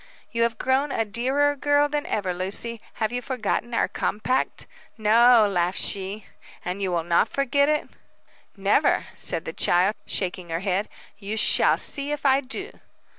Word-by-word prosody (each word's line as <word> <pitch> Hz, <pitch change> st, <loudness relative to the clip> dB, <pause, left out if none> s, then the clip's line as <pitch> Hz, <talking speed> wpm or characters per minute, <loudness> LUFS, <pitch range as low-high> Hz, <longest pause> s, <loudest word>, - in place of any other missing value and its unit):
"You 230 Hz, -, -2 dB
have 230 Hz, 0 st, +1 dB
grown 270 Hz, +2 st, 0 dB
a 225 Hz, -, 0 dB
dearer 265 Hz, +7 st, 0 dB
girl 290 Hz, +1 st, +2 dB
than 295 Hz, 0 st, -3 dB
ever, 195 Hz, -4 st, -1 dB
Lucy. 205 Hz, +5 st, -3 dB
Have 220 Hz, -1 st, -2 dB
you 245 Hz, 0 st, -3 dB
forgotten 240 Hz, -1 st, -2 dB
our -, -, +2 dB
compact?" 255 Hz, +5 st, -2 dB, 0.3 s
"No," 225 Hz, +1 st, +5 dB
laughed 180 Hz, -2 st, 0 dB
she. 195 Hz, +2 st, -1 dB, 0.4 s
"And 180 Hz, +3 st, -4 dB
you 190 Hz, -2 st, -1 dB
will 170 Hz, -2 st, 0 dB
not 170 Hz, 0 st, +2 dB
forget 280 Hz, +1 st, +1 dB
it?" 300 Hz, 0 st, 0 dB, 0.7 s
"Never," 200 Hz, +9 st, +2 dB
said -, -, -3 dB
the -, -, -5 dB
child, 180 Hz, +4 st, +3 dB
shaking 185 Hz, -2 st, -2 dB
her 165 Hz, +1 st, -2 dB
head. 195 Hz, +1 st, -1 dB, 0.3 s
"You 210 Hz, +2 st, -5 dB
shall -, -, +4 dB
see 280 Hz, +1 st, 0 dB
if 295 Hz, -1 st, -4 dB
I 270 Hz, 0 st, +4 dB
do." 285 Hz, -, -5 dB
225 Hz, 165 wpm, -24 LUFS, 195-270 Hz, 0.7 s, No